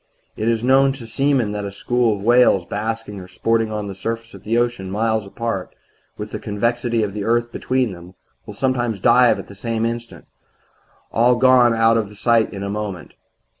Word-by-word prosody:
"It 110 +2 -1
is 115 -1 0
known 135 +1 +4
to 130 -4 -9
seamen 135 -2 0
that 105 0 -4
a 100 - -4
school 120 +2 0
of 100 - -8
whales 120 -6 +4
basking 105 0 -4
or 90 - -10
sporting 115 +4 0
on 105 -1 -3
the 100 - -6
surface 115 +4 -5
of - - -12
the 115 +2 0
ocean, 120 -6 -1
miles 110 +1 -1
apart, 105 -2 -4 0.4
with - - -6
the - - -5
convexity 115 +2 -1
of 100 -2 -3
the 105 -1 -4
earth 120 +2 0
between 130 -3 -1
them, 90 +1 -12 0.3
will 105 - -8
sometimes 120 -3 -1
dive 120 +1 +5
at - - -7
the - - -13
same 115 +2 -2
instant 115 0 -5 0.9
all 120 +2 +3
gone 125 -2 +5
out 115 0 +4
of 105 -2 -4
sight 115 0 +2
in 100 -1 -6
a - - -3
moment. 100 -4 -5
115 Hz, 195 wpm, -20 LUFS, 105-120 Hz, 0.9 s, dive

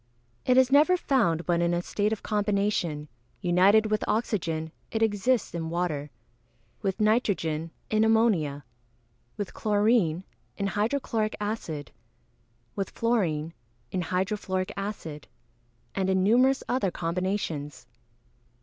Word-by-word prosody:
_ - - -39 0.5
It 250 - +5
is 260 0 +5
never 310 +6 +6
found 205 - +1
but 170 -1 +1
in 170 0 +2
a 175 - 0
state 210 +3 0
of 220 - -3
combination; 200 -7 0 0.3
united 190 +4 +4
with 215 - +1
oxygen, 170 -8 -1 0.2
it 225 0 0
exists 220 +3 +1
in 165 -1 -3
water; 165 -4 -2 0.7
with 195 -3 -2
nitrogen, 195 -8 +1 0.2
in 215 0 +3
ammonia; 205 -11 +2 0.7
with 205 -3 -4
chlorine, 205 -5 +2 0.3
in 200 - -1
hydro 210 +7 0
chloric 215 -4 -1
acid; 190 - -4 0.8
with 195 -1 -2
fluorine, 170 -10 0 0.4
in 185 - -1
hydro 185 +4 -1
fluoric 185 -2 -2
acid; 165 -8 -6 0.7
and 190 -1 0
in 190 -1 +2
numerous 250 +6 +4
other 245 -6 +1
combinations. 170 -5 -3
195 Hz, 125 wpm, -27 LUFS, 170-220 Hz, 0.8 s, never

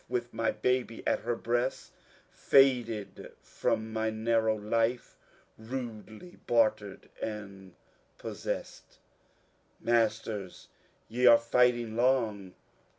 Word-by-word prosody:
With 120 -1 -3
mj 115 -1 -1
baby 125 -2 0
at - - +1
her 120 +1 -2
breast, 120 +3 -2 0.4
Faded 120 -6 +2
from 110 0 -2
my 110 0 0
narrow 110 0 +1
life, 115 +3 -1 0.5
Radelj 115 - -8
bartered 110 -4 +1
and 100 -4 -7 0.4
possest. - - -6 0.8
Masters, 110 -4 -1 0.4
je 125 +3 +2
are 115 - +9
fighting 120 -1 +2
long. 115 -6 0
115 Hz, 90 wpm, -30 LUFS, 110-120 Hz, 0.8 s, are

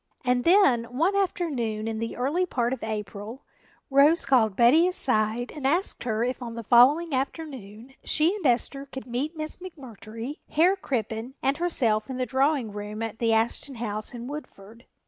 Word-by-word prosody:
And 250 0 +1
then 335 - +5
one 310 +12 0
afternoon 275 - -1
in 220 -1 -3
the 230 0 -4
early 300 +9 0
part 245 -5 -1
of 265 - -6
April, 215 +3 -6 0.5
Rose 290 +5 +5
called 220 -7 +3
Betty 265 - +5
aside 245 -8 0
and 280 -3 -2
asked 340 +2 0
her 225 -1 0
if 250 +1 -2
on 235 -2 -6
the 230 - -6
following 275 +9 +5
afternoon 260 -4 -5
she 325 +6 +2
and 410 - -7
Esther 275 +1 0
could 265 -1 -8
meet 270 +7 -3
Miss 310 0 -3
McMurtry, 260 - -9
Herr 345 +5 +3
Crippen 235 - -4
and 275 +2 +1
herself 250 -11 0
in 260 - -4
the 255 - -1
drawing 265 -3 +1
room 210 +2 -5
at 225 -1 -5
the 230 -1 +1
Ashton 230 +5 0
house 215 -2 -3
in 235 0 -7
Woodford. 235 -6 -10
250 Hz, 170 wpm, -26 LUFS, 225-300 Hz, 0.5 s, then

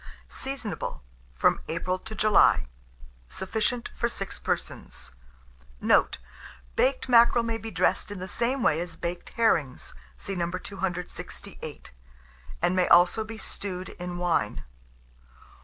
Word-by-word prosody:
Seasonable 245 - -4 0.3
from - - +3
April 180 +3 -1
to 220 +2 -8
July. 215 -2 +5 0.6
Sufficient 220 - -2
for 235 - 0
6 195 -4 -5
persons. - - -4 0.7
Note. - - +4 0.6
Baked 260 0 +2
mackerel 235 -1 +6
may 230 -1 -2
be 225 - -6
dressed - - +1
in 205 - -6
the 185 +1 -5
same 240 +5 0
way 150 - +3
as 175 -1 -5
baked 175 +1 -4
herrings 160 - +1 0.2
(see 195 - -4
No. 170 -2 -1
268), 185 -1 -6 0.7
and 180 - +3
may 185 -1 +3
also 175 +6 +6
be 225 +1 -8
stewed 185 -4 -5
in 180 0 -6
wine. 170 - 0
190 Hz, 125 wpm, -27 LUFS, 175-225 Hz, 0.7 s, mackerel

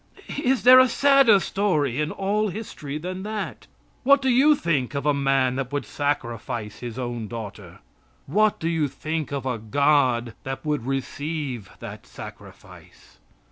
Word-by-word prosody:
Is 260 -3 +2
there 255 +1 +9
a 255 - +6
sadder 275 -5 +5
story 155 - 0
in 150 - -1
all 205 +4 0
history 175 -8 -6
than 185 +4 -5
that? 210 +1 -5 0.3
What 280 +2 +5
do 265 -1 0
you 275 +5 +5
think 145 - -1
of 140 0 -2
a 150 - +3
man 135 -2 +1
that 135 -1 -3
would 145 0 -2
sacrifice 120 -6 -3
his 120 -1 -7
own 120 -3 -4
daughter? 105 -3 -8 0.4
What 210 +8 +2
do 165 - -2
you 165 -3 +1
think 155 +2 -4
of 140 -2 -3
a 125 -3 -2
God 125 -1 +2
that 135 +3 -6
would 150 -5 -1
receive 135 -4 -4
that - - -9
sacrifice? - - -13
145 Hz, 155 wpm, -24 LUFS, 130-200 Hz, 0.4 s, there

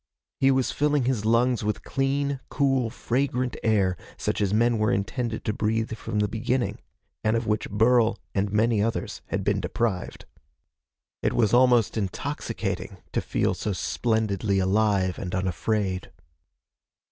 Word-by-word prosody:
He 135 - +4
was 130 -1 +2
filling 145 -3 +1
his 120 -5 0
lungs 115 +1 +2
with 105 0 -2
clean, 140 0 0
cool, 135 -4 +1
fragrant 125 +1 -1
air 100 -5 +2 0.2
such - - -1
as 100 -2 +1
men 115 +1 +3
were 110 0 +2
intended 110 +3 -2
to 105 - 0
breathe 110 +2 -1
from 110 - -4
the 105 0 +2
beginning, 120 +4 -1 0.4
and 110 +1 +2
of 115 - -2
which 105 0 -1
Burl 115 +2 +3 0.2
and 100 0 0
many 110 0 +2
others 115 +2 -2
had - - -2
been - - +1
deprived. 110 -6 -2 1.0
It - - +1
was 110 -3 +2
almost 120 -3 +4
intoxicating 100 -4 -3
to - - 0
feel - - 0
so 105 - -2
splendidly 110 -1 0
alive 95 -1 +2
and 90 -1 -4
unafraid. 95 +1 -1
110 Hz, 145 wpm, -26 LUFS, 105-125 Hz, 1.0 s, He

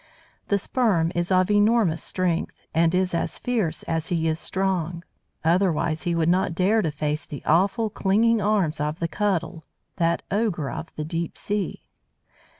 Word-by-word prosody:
The 200 - +2
Sperm 195 -6 +1
is 175 +1 -1
of 185 +2 +3
enormous 205 -5 +3
strength, 180 -3 -1
and 165 +1 +3
is 185 -1 +1
as 170 - -1
fierce 215 -11 -1
as 165 -1 -2
he 165 -2 0
is 160 0 0
strong. 175 -3 -1 0.4
Otherwise 165 -1 +1
he 170 - +1
would 165 -1 +1
not 180 -1 +2
dare 200 +5 +3
to 160 - 0
face 150 +1 -2
the 145 - -9
awful, 195 +7 +2
clinging 215 +3 +2
arms 195 -7 +1
of 150 +1 -1
the 170 - -1
Cuttle, 180 -4 -1 0.3
that 170 0 +1
ogre 195 -9 0
of 165 - -6
the 155 - -4
deep 165 +1 -3
sea. 205 -3 -3
175 Hz, 160 wpm, -24 LUFS, 160-200 Hz, 0.4 s, of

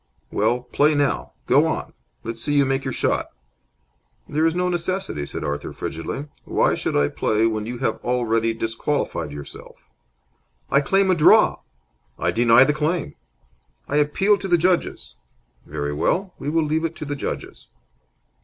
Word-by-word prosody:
"Well, 125 +1 +1
play 145 +5 +2
now. 140 - 0
Go - - +4
on! - - -3 0.3
Let's 115 0 -5
see 145 +3 -1
you 140 -1 +4
make 135 0 0
your 130 - -3
shot." - - 0 1.0
"There 155 +2 +1
is 165 - -1
no 180 0 +1
necessity," 175 - -2
said - - -5
Arthur, 75 0 -3
frigidly. 80 - -5 0.2
"Why - - +1
should - - -2
I 70 0 +3
play 110 +7 0
when 110 -1 -1
you 120 +1 -4
have 130 - -1
already 115 -2 +1
disqualified 115 - -2
yourself?" 70 -1 -10 1.0
"I 140 - +5
claim 195 +6 +2
a - - +5
draw!" 155 - +5 0.6
"I - - 0
deny 115 +2 +6
the 150 - +2
claim." 155 +4 -1 0.7
"I 145 - 0
appeal 195 +8 +3
to 195 - -4
the 175 -2 +4
judges." 175 - 0 0.5
"Very 75 -1 -3
well. 180 - 0
We 145 - -3
will 165 +1 +2
leave 155 +2 0
it 165 0 -2
to - - -6
the 145 0 -3
judges." - - -6
140 Hz, 165 wpm, -22 LUFS, 115-165 Hz, 1.0 s, deny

